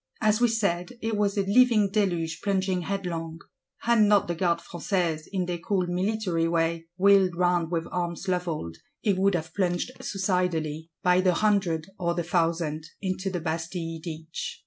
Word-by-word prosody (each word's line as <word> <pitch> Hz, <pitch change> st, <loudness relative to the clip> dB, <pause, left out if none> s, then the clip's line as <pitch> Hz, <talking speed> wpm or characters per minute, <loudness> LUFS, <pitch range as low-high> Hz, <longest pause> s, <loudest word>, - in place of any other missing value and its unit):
As 215 Hz, +1 st, +2 dB
we 240 Hz, -, +6 dB
said, 200 Hz, -5 st, -1 dB
it 225 Hz, -1 st, 0 dB
was 205 Hz, -1 st, 0 dB
a 200 Hz, -, +3 dB
living 215 Hz, -1 st, +4 dB
deluge, 175 Hz, -6 st, 0 dB
plunging 190 Hz, -2 st, 0 dB
headlong; 170 Hz, -3 st, -3 dB, 0.4 s
had 235 Hz, -1 st, +3 dB
not 205 Hz, -2 st, +4 dB
the 175 Hz, -, -1 dB
Gardes 170 Hz, 0 st, 0 dB
Françaises, 170 Hz, -3 st, -2 dB
in 185 Hz, -2 st, -1 dB
their 175 Hz, -1 st, -3 dB
cool 185 Hz, +1 st, 0 dB
military 180 Hz, -2 st, 0 dB
way, 165 Hz, 0 st, 0 dB
"wheeled 195 Hz, -2 st, +5 dB
round 175 Hz, -2 st, +2 dB
with 165 Hz, -1 st, -1 dB
arms 175 Hz, +1 st, -3 dB
levelled," 170 Hz, -, -2 dB, 0.3 s
it 205 Hz, -3 st, +2 dB
would 195 Hz, 0 st, +3 dB
have 160 Hz, -1 st, -4 dB
plunged 180 Hz, +3 st, 0 dB
suicidally, 175 Hz, -5 st, -1 dB
by 180 Hz, 0 st, +4 dB
the 185 Hz, -2 st, +3 dB
hundred 190 Hz, -7 st, +1 dB
or 170 Hz, -1 st, 0 dB
the 175 Hz, -, -1 dB
thousand, 165 Hz, -2 st, 0 dB
into 190 Hz, 0 st, -2 dB
the 180 Hz, -2 st, -3 dB
Bastille 165 Hz, 0 st, -3 dB
ditch. 160 Hz, -1 st, -6 dB
180 Hz, 165 wpm, -27 LUFS, 165-195 Hz, 0.4 s, we